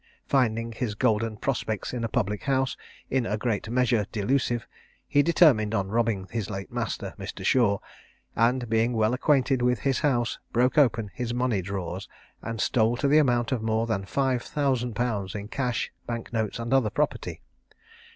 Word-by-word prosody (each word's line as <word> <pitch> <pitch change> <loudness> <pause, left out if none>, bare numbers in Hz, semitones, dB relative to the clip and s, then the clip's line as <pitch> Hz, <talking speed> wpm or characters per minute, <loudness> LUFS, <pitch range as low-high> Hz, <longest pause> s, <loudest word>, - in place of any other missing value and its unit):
Finding 115 -4 +1
his 115 -2 -3
golden 110 -2 +1
prospects 110 -4 -2
in 120 -2 -3
a - - +1
public 105 -1 -1
house, 135 -1 +1 0.4
in 130 -3 +1
a 105 - -1
great 110 -1 -2
measure, 120 -4 +2
delusive, 120 +1 0 0.4
he 145 - +4
determined 140 -10 +4
on 95 -2 -1
robbing 110 -4 0
his 110 -4 -3
late 95 -2 -6
master, - - -3
Mr. - - -6
Shaw; 115 -6 +4 0.6
and, 120 +2 +2
being 115 +2 +2
well 110 0 +2
acquainted 135 -1 +2
with 125 -2 +1
his 135 -2 +1
house, 120 -6 0
broke 125 +2 +2
open 115 -8 +3
his 120 +1 -3
money 120 -5 +1
drawers, 95 -1 -5 0.3
and 115 -1 -5
stole 115 +2 +2
to 140 - +1
the 150 +2 +6
amount 120 -4 +2
of 125 -4 0
more 110 0 +1
than 110 -4 -1
five 130 +2 0
thousand 130 -5 -1
pounds 105 -5 -2
in 105 0 -6
cash, 125 -2 -1 0.2
bank 115 -1 -5
notes, 110 -2 -1
and 120 +2 -2
other 130 -5 +4
property. 65 - -2
115 Hz, 170 wpm, -26 LUFS, 110-125 Hz, 0.6 s, the